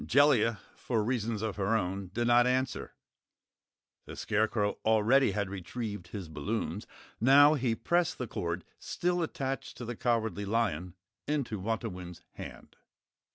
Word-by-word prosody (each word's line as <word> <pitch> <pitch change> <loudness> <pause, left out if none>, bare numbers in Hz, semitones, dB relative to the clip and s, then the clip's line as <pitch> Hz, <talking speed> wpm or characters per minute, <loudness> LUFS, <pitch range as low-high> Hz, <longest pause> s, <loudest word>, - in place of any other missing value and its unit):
Jellia, 120 -5 +4 0.2
for 115 -4 -1
reasons 115 -2 -1
of 110 -3 -2
her 100 +3 +2
own, 95 -1 -3
did 120 +4 -1
not 120 +1 +5
answer. 130 0 -1 1.1
The - - -7
Scarecrow 105 -1 0
already 110 +5 +4
had 100 0 -1
retrieved 100 +1 -5
his 95 -2 -6
balloons. 85 +4 -3 0.3
Now 145 +5 +7
he 125 -6 0
pressed 175 +8 +1
the 125 - -3
cord, 85 -5 -3 0.2
still 180 0 -1
attached 135 -4 -3
to 120 - -6
the 120 +1 -4
Cowardly 110 -4 0
Lion, 95 -5 -1 0.3
into 140 -8 -1
Wantowin's 95 -5 -4
hand. - - -10
110 Hz, 135 wpm, -30 LUFS, 100-125 Hz, 1.1 s, Now